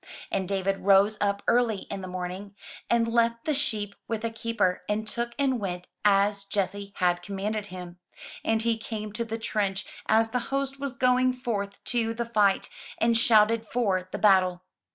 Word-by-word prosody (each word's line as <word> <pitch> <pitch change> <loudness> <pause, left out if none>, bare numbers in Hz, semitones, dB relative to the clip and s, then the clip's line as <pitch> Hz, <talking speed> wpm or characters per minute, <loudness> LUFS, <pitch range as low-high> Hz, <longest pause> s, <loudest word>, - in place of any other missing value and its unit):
And 190 -1 -1
David 195 0 0
rose 200 +2 +5
up 200 0 0
early 235 -4 +2
in 200 -1 -4
the 185 - -6
morning, 185 +2 -6 0.3
and 235 -1 +3
left 230 0 +1
the 310 - +1
sheep 220 -8 -1
with 225 -1 -2
a 230 - -1
keeper, 225 -5 0
and 215 +1 -1
took, 235 +1 -3
and 265 -3 +1
went, 180 -3 -4 0.2
as 200 0 +3
Jesse 200 0 -2
had 175 -1 +1
commanded 205 +3 -3
him; 180 -2 -9 0.4
and 225 0 +1
he 230 -1 +1
came 215 -2 -5
to 235 +1 -2
the 225 0 -4
trench 205 -3 -1 0.2
as 225 +1 +3
the 250 - +1
host 275 0 -2
was 275 -3 -4
going 255 0 +3
forth 205 -6 -4
to 230 -2 -1
the 235 +1 -2
fight, 210 -4 +2 0.3
and 230 0 +3
shouted 225 -1 +4
for 200 -6 -1
the - - -3
battle. 185 -3 +4
215 Hz, 175 wpm, -27 LUFS, 195-230 Hz, 0.4 s, rose